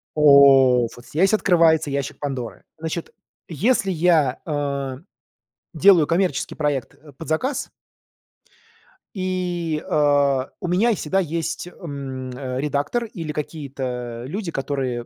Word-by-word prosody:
О, 135 -4 +6
вот 120 - -14
здесь 185 - +1
открывается 165 -7 +3
ящик 140 0 -3
Пандоры. 135 -5 -5
Значит, 160 +1 -5 0.3
если 195 - +1
я, 160 -6 +2
э, 140 -3 -3 0.8
делаю 170 -2 +5
коммерческий 175 -4 0
проект, 145 -5 -2
э, 150 0 -17
под 160 +5 -10
заказ 260 - -2 1.4
и, 180 -4 -2
а, 140 -3 +2
у 180 - -4
меня 190 +7 +2
е 225 - +2
всегда 185 +4 -1
есть, 165 0 -3
м, 135 -7 -7
редактор 140 - -2
или 165 -8 -6
какие-то 130 -6 -5
люди, 175 +5 -4
которые, 135 -4 -3
150 Hz, 115 wpm, -22 LUFS, 135-175 Hz, 1.4 s, О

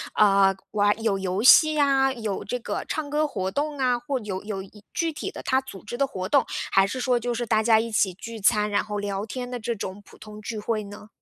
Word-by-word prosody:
呃， 195 -2 +5 0.2
玩 205 +1 +2
有 210 -4 +1
游 190 +1 -2
戏 310 +5 +7
呀， 270 -2 +3
有 220 -6 -4
这 250 - -3
个 - - -4
唱 305 -2 -3
歌 300 +1 +1
活 190 -9 -3
动 295 0 -2
啊， 250 -2 +2
或 275 +1 -3
有 200 -3 -5
有 205 -2 -4 0.3
具 330 -2 -1
体 - - -5
的 - - -8
他 260 +1 +1
组 260 -8 -11
织 240 +3 -5
的 275 - +2
活 185 -8 -5
动。 280 +2 +3 0.3
还 195 0 +5
是 255 +6 -4
说 250 -1 +2
就 240 +1 -2
是 240 +1 -2
大 220 -1 +2
家 220 -1 +5
一 230 +1 -2
起 195 -4 +2
聚 225 +4 -8
餐， 210 0 +3
然 205 - +1
后 210 -1 -5
聊 200 0 -3
天 245 +2 -5
的 250 - -4
这 235 +1 -2
种 195 0 -6
普 - - -17
通 215 0 -11
聚 220 0 -5
会 215 0 -2
呢？ 205 +1 -11
220 Hz, 260 characters per minute, -25 LUFS, 205-260 Hz, 0.3 s, 戏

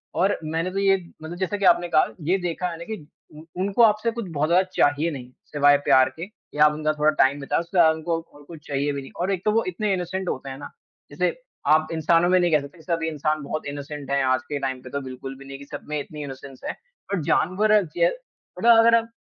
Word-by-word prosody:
और 195 +3 +2
मैंने 165 +4 -2
तो 195 - -5
ये 195 0 +4 0.3
मतलब 170 +2 -7
जैसे 190 +2 -2
कि 200 - -1
आपने 175 -1 +4
कहा, 155 -2 +4 0.2
ये 180 +6 +1
देखा 180 0 -3
मैंने 170 0 -7
कि 220 -4 -6 0.3
उ 155 - -11 0.2
उनको 200 +4 +1
आपसे 215 +1 +3
कुछ 235 -1 -5
बहुत 150 +1 0
ज़्यादा 180 +2 +4
चाहिए 145 +4 +2
नहीं, 125 -3 -8 0.2
सिवाय 145 -1 +4
प्यार 130 0 +5
के 170 - -4 0.3
या 150 - +7
आप 150 - +4
उनका 155 0 0
थोड़ा 150 0 +2
टाइम 140 +2 +1
बिताए। 140 - -1
उससे 170 0 -7
ज़्यादा 165 -2 +7
उनको 165 +1 -2 0.3
कुछ 160 -3 -12
चाहिए 140 +1 -1
भी 140 - -4
नहीं 135 - -12
और 190 - 0
एक 190 -2 -2
तो 215 - +3
वो 225 +2 +2
इतने 200 +3 -1
इनोसेंट 185 +1 -3
होते 135 +1 -4
हैं 130 - -7
ना। 145 - -8 0.4
जैसे - - 0 0.4
आप 155 0 +4
इंसानों 165 +2 +3
में 185 0 +4
नहीं 175 -1 +2
कह 150 -2 +4
सकते 140 +4 -12
सभी 165 0 -2
इंसान 155 0 -1
बहुत 155 +2 -4
इनोसेंट 145 0 -6
हैं 140 -1 +2
आज 130 0 +2
के 145 -1 -2
टाइम 130 -1 -3
पे, 130 - -11
तो 140 +2 -3
बिल्कुल 135 0 -7
भी 140 - -13
नहीं 135 0 -8
कि 140 - -11
सब 145 0 -9
में 150 -1 -1
इतनी 150 +1 -7
इनोसेंस 135 -1 -9
है, - - -2 0.4
बट 185 - 0
जानवर 205 +6 +3
ज - - +4 0.5
बट - - -3
अगर 230 0 +7
आप 230 0 +1
160 Hz, 245 wpm, -24 LUFS, 145-185 Hz, 0.5 s, या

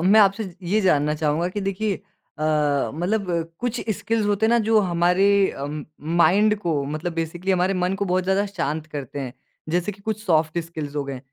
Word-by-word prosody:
मैं 195 +5 +6
आपसे 200 +2 +3 0.2
ये 210 +5 +2
जानना 150 -5 +2
चाहूँगा 155 +2 0
कि 205 +3 -4
देखिए 195 +1 -1 0.4
अ, 155 - -4 0.5
मतलब 175 -2 -1
कुछ 245 0 -2 0.2
स्किल्स 225 -2 -1
होते 205 +1 +2
हैं - - +2
ना 235 - +5
जो 225 0 +5
हमारे 180 +1 +2 0.2
अम, 145 +2 -5 0.3
माइंड 200 +6 +5
को 165 -8 -1
मतलब 155 +4 -3
बेसिकली 170 +3 -2
हमारे 185 +1 +2
मन 180 +1 0
को 200 +1 -1
बहुत 185 -1 +1
ज़्यादा 190 +2 +2
शांत 155 -5 -3
करते 145 -2 -6
हैं। 130 -3 -5 0.4
जैसे 175 +4 0
कि 200 - -17
कुछ 215 0 -3
सॉफ्ट 160 -1 +2
स्किल्स 160 -3 -5
हो 145 - 0
गए, 135 -2 -5
180 Hz, 190 wpm, -23 LUFS, 155-200 Hz, 0.5 s, मैं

